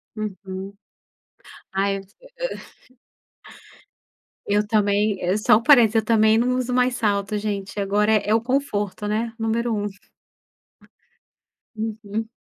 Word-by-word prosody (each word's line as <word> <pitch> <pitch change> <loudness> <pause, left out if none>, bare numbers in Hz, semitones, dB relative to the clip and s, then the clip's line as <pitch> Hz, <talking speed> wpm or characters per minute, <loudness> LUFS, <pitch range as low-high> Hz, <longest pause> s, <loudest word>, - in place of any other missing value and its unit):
Uhum. 195 -2 -6 1.0
Ai, 195 +1 0
eu 195 - -9
se 195 +3 -27 2.3
Eu 205 +1 +2
também, 205 -1 +1
eh, 180 +3 +1
só 210 0 +5
um 230 - -4
parênteses, 240 -6 +6
eu 220 - +3
também 220 -1 +4
não 250 +2 +1
uso 250 0 -2
mais 250 0 +2
salto 205 -2 0
gente, 205 -1 -4
agora 205 +2 +1
é 210 -1 +1
é - - +5
o 225 - +2
conforto, 225 -6 -2
né. 220 +2 -1
Número 230 +1 -1
1. 205 -1 -1 1.9
Uhum. 220 0 -4
215 Hz, 125 wpm, -23 LUFS, 200-225 Hz, 2.3 s, parênteses